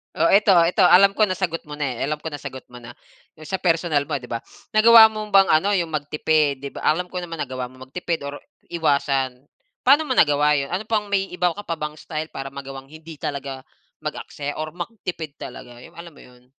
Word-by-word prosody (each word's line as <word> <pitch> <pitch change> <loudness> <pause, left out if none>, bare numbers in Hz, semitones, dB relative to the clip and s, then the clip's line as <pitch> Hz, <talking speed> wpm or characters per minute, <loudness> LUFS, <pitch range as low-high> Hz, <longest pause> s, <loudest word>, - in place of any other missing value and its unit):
Oh, - - +3
eto, 200 0 +5
eto 180 +3 +3
alam 195 +3 +6
ko 215 - +5
nasagot 185 -4 -3
mo 150 - -9
na, 140 -5 -3
eh, - - -1
alam 150 +1 -3
ko 160 - -4
nasagot 135 -3 -7
mo 125 - -12
na, 120 0 -11 0.4
'yong 155 -1 -13
sa 190 - -1
personal 165 -5 +1
mo 150 - -6
'di 125 -3 -4
ba. 115 - -2 0.3
Nagawa 220 0 +8
mo 215 -1 -5
bang 195 -1 +6
ano 195 +7 +3
'yong 170 -4 0
magtipid? 150 -1 0
'Di 140 - -5
ba - - -8
alam 180 +3 +1
ko 180 - -6
naman 165 -3 -5
nagawa 130 -1 -4
mo 130 +1 -14
magtipid 170 0 -3
or 140 0 -6 0.3
iwasan, 140 -5 0 0.4
paano 290 +4 +5
mo 260 - -1
nagawa 150 -5 +4
'yon? 140 -1 -1
Ano 190 +4 -3
pang 210 -2 -1
may 195 -1 +1
iba 180 0 +1
ko 170 - -8
ka 205 - -8
pa 165 - -2
bang 150 0 -4
style 155 0 -5
para 135 0 -7
magawang 135 -1 -8
hindi 160 0 -11
talaga 135 -2 -5 0.4
mag-aksaya 145 0 -5
or 155 - -4
magtipid 175 -6 -6
talaga, 120 -1 -10
'yong 155 - -15
alam 170 -2 -10
mo - - -16
'yon? 125 0 -19
155 Hz, 220 wpm, -22 LUFS, 140-180 Hz, 0.4 s, Nagawa